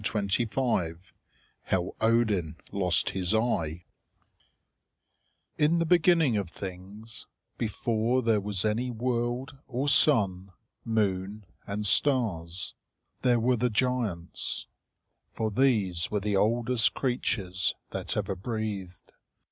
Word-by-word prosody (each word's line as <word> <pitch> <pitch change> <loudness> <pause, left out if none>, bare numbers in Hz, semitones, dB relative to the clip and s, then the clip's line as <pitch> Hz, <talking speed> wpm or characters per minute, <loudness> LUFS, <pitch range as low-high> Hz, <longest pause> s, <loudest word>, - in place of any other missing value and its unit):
CHAPTER 105 -2 -1 0.2
XII 115 -10 0 0.7
HOW 90 -1 0
ODIN 110 -8 +2 0.2
LOST 90 -3 +2
HIS 95 +2 0
EYE 90 -8 0 1.8
In 155 +3 +4
the 170 - +2
beginning 165 - +4
of 100 -4 -2
things, 100 +5 -8 0.3
before 115 +2 0
there 110 -3 +3
was 100 -1 -2
any 115 +4 0
world 120 +2 -2
or 130 +4 -2
sun, 100 -11 +3 0.3
moon, 105 -2 -1 0.2
and 105 +1 -3
stars, 95 - +1 0.5
there 120 -2 +3
were 125 +2 +2
the 125 +2 +1
giants; 115 -7 -1 0.7
for 110 -1 -1
these 105 -8 +2
were 105 - 0
the 105 0 -1
oldest 115 +3 +2
creatures 100 -8 0 0.2
that - - -3
ever 100 -2 -1
breathed. 100 -3 -5
110 Hz, 110 wpm, -28 LUFS, 95-120 Hz, 1.8 s, In